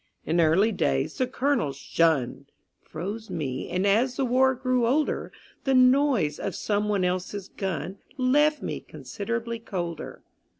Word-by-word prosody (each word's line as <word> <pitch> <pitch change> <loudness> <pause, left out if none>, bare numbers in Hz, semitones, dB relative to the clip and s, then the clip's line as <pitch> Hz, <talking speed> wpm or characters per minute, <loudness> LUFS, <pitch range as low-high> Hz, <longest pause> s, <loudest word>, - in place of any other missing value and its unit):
In 170 +2 +2
early 175 +8 +4
days 70 - -1
the 255 - +2
Colonel's 255 - 0
"Shun!" 140 -1 +1 0.3
Froze 205 +7 -6
me; 130 -5 -3
and, 185 +2 0
as 235 +6 +3
the 270 - 0
War 260 +1 +3
grew 255 -1 +1
older, 295 +5 0 0.3
The 270 -1 +2
noise 255 - +4
of 195 - -3
someone 205 -2 0
else's 185 +2 -3
gun 190 0 -4 0.2
Left 295 +4 +3
me - - -3
considerably 230 +2 -5
colder. 175 -7 -5
210 Hz, 135 wpm, -26 LUFS, 170-255 Hz, 0.3 s, early